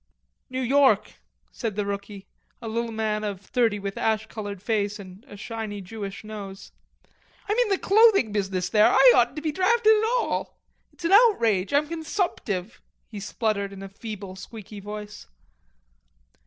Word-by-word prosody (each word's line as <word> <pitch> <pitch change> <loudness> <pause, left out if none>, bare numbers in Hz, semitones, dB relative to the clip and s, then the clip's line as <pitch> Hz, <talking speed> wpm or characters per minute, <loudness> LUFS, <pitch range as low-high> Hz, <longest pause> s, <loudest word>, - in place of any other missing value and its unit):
"New 260 0 -3
York," 260 -4 +3 0.3
said 220 -4 -4
the 205 -1 -1
rookie, 200 0 -6 0.3
a 230 - -7
little 230 +1 -2
man 215 -1 -1
of 200 -3 -3
thirty 225 +1 0
with 200 -1 -5
an - - -3
ash 220 -1 +1
colored 205 -3 -7
face 205 0 -1
and 190 +1 -12
a 205 - -11
shiny 215 -1 -5
Jewish 200 +2 -7
nose. 200 -2 -9 0.8
"I'm 415 - +1
in 485 -2 +2
the 390 - +2
clothing 400 - +4
business 190 -3 -1
there. 210 +1 +5
I 265 -2 +7
oughtn't 245 +1 +3
to 305 - -6
be 310 - 0
drafted 435 +6 +4
at 440 +1 +1
all. - - -3 0.3
It's 345 - -10
an 335 - +1
outrage. 235 - +4
I'm 290 +1 +2
consumptive." 315 - -3 0.3
He 210 - -7
spluttered 205 -1 -2
in 195 0 -9
a 195 - -8
feeble 200 -2 -8
squeaky 210 +1 -10
voice. 210 +1 -8
215 Hz, 165 wpm, -25 LUFS, 200-265 Hz, 0.8 s, I